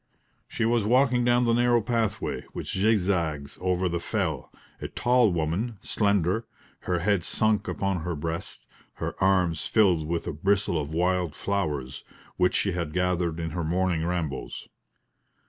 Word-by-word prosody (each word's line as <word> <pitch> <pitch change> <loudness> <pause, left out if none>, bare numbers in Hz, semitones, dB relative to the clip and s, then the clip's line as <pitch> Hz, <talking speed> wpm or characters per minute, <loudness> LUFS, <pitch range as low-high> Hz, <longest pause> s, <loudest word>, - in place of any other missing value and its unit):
She 115 - -2
was 115 -1 +2
walking 125 +2 +3
down 120 0 +3
the 115 - +3
narrow 120 0 +4
pathway, 115 -2 -1
which - - -5
zigzags 90 -8 0
over 90 0 +1
the 85 0 -1
fell 85 - -2 0.3
a - - -3
tall 120 -3 +3
woman, 85 +8 -1
slender, 100 +1 +1 0.3
her 90 - -1
head 95 +1 +1
sunk 110 +3 +1
upon 95 -2 -1
her 85 +1 -3
breast, 80 +4 -5 0.3
her - - -4
arms 90 -5 +2
filled 90 -8 +3
with 85 0 -2
a - - -3
bristle 95 0 +1
of 75 +1 -6
wild 90 -1 0
flowers, 75 -10 -2 0.3
which 90 0 +2
she 100 - +1
had 85 -4 -3
gathered 90 -2 0
in 80 -1 -3
her 85 +2 -3
morning 85 0 0
rambles. 85 -5 -3
90 Hz, 150 wpm, -26 LUFS, 85-105 Hz, 0.3 s, narrow